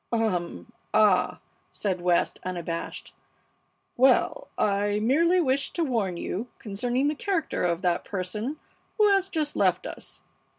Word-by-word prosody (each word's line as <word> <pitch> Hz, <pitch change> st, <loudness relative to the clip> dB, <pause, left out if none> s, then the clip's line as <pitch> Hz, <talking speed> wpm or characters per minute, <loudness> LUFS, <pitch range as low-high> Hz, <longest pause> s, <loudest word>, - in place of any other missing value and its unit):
"Um! 180 Hz, -, -1 dB, 0.2 s
Ah!" 210 Hz, -4 st, +3 dB, 0.3 s
said 185 Hz, -4 st, -2 dB
West, 175 Hz, -1 st, +1 dB
unabashed. 175 Hz, -2 st, -5 dB, 0.8 s
"Well, 265 Hz, -, +3 dB
I 205 Hz, 0 st, +1 dB
merely 330 Hz, +11 st, +3 dB
wished 275 Hz, -4 st, 0 dB
to 340 Hz, -, +1 dB
warn 220 Hz, -, -1 dB
you 210 Hz, +7 st, -4 dB
concerning 245 Hz, +6 st, -1 dB
the 300 Hz, -, +1 dB
character 335 Hz, 0 st, -1 dB
of 175 Hz, 0 st, 0 dB
that 175 Hz, -1 st, +1 dB
person 210 Hz, +9 st, -4 dB, 0.4 s
who 425 Hz, -1 st, +5 dB
has 390 Hz, -1 st, +2 dB
just 310 Hz, -4 st, -1 dB
left -, -, +2 dB
us. -, -, -7 dB
220 Hz, 130 wpm, -26 LUFS, 185-295 Hz, 0.8 s, who